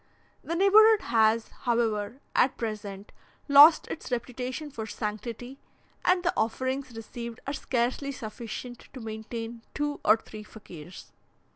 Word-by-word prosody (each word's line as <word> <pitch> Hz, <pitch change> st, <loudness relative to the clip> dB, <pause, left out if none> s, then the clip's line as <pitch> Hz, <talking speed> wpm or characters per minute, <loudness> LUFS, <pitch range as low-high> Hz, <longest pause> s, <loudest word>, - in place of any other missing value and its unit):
The 335 Hz, -, -3 dB
neighbourhood 420 Hz, +4 st, +6 dB
has, 225 Hz, 0 st, +3 dB
however, 230 Hz, 0 st, -1 dB
at 260 Hz, -, +3 dB
present, 210 Hz, -3 st, -5 dB, 0.4 s
lost 290 Hz, +3 st, +8 dB
its -, -, -6 dB
reputation 250 Hz, +4 st, -4 dB
for 220 Hz, -5 st, -6 dB
sanctity, 230 Hz, +5 st, -5 dB, 0.4 s
and 360 Hz, 0 st, +3 dB
the 355 Hz, 0 st, +1 dB
offerings 260 Hz, +3 st, -2 dB
received 235 Hz, +1 st, -7 dB
are 280 Hz, -, -3 dB
scarcely 260 Hz, +1 st, -1 dB
sufficient 240 Hz, 0 st, -8 dB
to 260 Hz, -, -8 dB
maintain 225 Hz, +1 st, -6 dB
two 290 Hz, 0 st, -2 dB
or 215 Hz, +2 st, +6 dB
three 215 Hz, -1 st, -11 dB
Fakirs. 180 Hz, -6 st, -12 dB
235 Hz, 125 wpm, -28 LUFS, 220-275 Hz, 0.4 s, lost